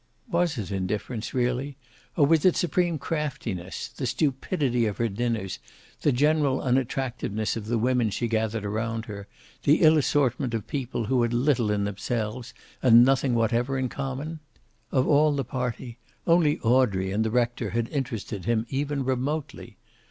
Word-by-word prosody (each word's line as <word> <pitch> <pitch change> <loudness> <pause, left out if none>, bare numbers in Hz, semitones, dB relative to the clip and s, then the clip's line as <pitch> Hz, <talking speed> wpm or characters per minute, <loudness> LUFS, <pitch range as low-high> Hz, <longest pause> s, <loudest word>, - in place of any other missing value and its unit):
Was 170 -4 +1
it 100 -5 -4
indifference, 105 +4 -3
really, 130 +2 -1 0.4
or 145 - +6
was 160 +1 +3
it 185 - +5
supreme 175 -1 +1
craftiness, 130 - -4
the 130 - -5
stupidity 135 -3 0
of 105 - -3
her 115 - +1
dinners, 110 -3 -2 0.4
the 145 - +3
general 145 0 +2
unattractiveness 125 -4 -1
of 110 -2 -6
the 120 +1 +1
women 120 0 +2
she 120 +4 -2
gathered 110 -1 -1
around 110 +2 -2
her, 100 -1 -8 0.3
the 150 +4 +3
ill 155 0 +7
assortment 130 -4 +1
of 110 - -3
people 125 -4 -3
who 125 +2 +2
had 120 0 +1
little 125 -3 +2
in 105 -1 +1
themselves 110 +4 -3 0.3
and 120 -1 +7
nothing 135 -1 +2
whatever 120 +3 +1
in 130 -1 -1
common? 140 +5 -5 0.5
Of 130 -1 +2
all 150 +1 +4
the 135 -2 -1
party, 125 -1 -4 0.3
only 165 -3 +4
Audrey 110 -6 +2
and 105 +3 +1
the 110 - 0
rector 120 -1 0
had 115 +3 -1
interested 115 - -4
him 115 -1 +1
even 140 0 -2
remotely. 135 +4 -3
125 Hz, 160 wpm, -26 LUFS, 110-140 Hz, 0.5 s, ill